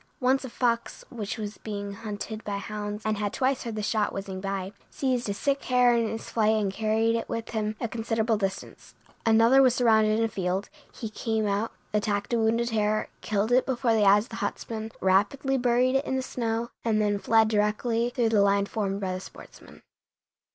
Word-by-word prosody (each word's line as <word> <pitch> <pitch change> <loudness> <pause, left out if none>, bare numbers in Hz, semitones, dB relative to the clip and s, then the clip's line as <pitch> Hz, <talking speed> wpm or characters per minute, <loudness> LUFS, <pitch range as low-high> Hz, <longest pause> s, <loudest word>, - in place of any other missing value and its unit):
Once 265 +1 +2
a 260 - -6
fox, 235 -1 -1
which 220 -2 -4
was 210 -1 -6
being 205 -2 -5
hunted 215 +1 -6
by 205 -1 -3
hounds 210 +1 -5
and 215 -1 0
had 205 -1 -1
twice 260 0 0
heard 230 -3 -5
the 215 - -3
shot 215 0 0
whizzing 195 -1 -5
by, 195 -1 -3 0.2
seized 250 -5 -1
a - - 0
sick 280 +5 -1
hare 250 -1 +4
in 230 -1 +1
his 225 - -6
flight 220 -1 +2
and 205 -3 0
carried 225 +2 +1
it 230 - -3
with 230 0 -4
him 215 -1 -2
a 235 - -1
considerable 225 0 0
distance. 195 -2 -5 0.3
Another 230 +4 +6
was 255 -2 +4
surrounded 220 -3 +4
in 225 - +2
a - - +1
field; 190 -1 -2 0.2
he 230 - -6
came 220 0 -2
out, 205 +2 -1 0.2
attacked 210 +1 -1
a 235 - +2
wounded 230 +2 +1
hare, 215 -1 0
killed 210 +2 -1
it 255 +1 +4
before 250 -3 +1
the 220 -2 +3
eyes 205 +1 +6
of - - -20
the 225 - -7
huntsmen, 220 -1 -4
rapidly 205 +9 +2
buried 250 0 +2
it 270 +2 +1
in 265 - -1
the 260 - -1
snow, 235 -2 -2
and 220 -2 +1
then 205 -1 +1
fled 225 +1 +4
directly 220 +2 +1
through 240 -2 +1
the 215 -2 +3
line 200 0 +3
formed 200 -2 -2
by 190 -2 -2
the 185 - -4
sportsmen. - - -14
220 Hz, 205 wpm, -27 LUFS, 205-235 Hz, 0.3 s, Another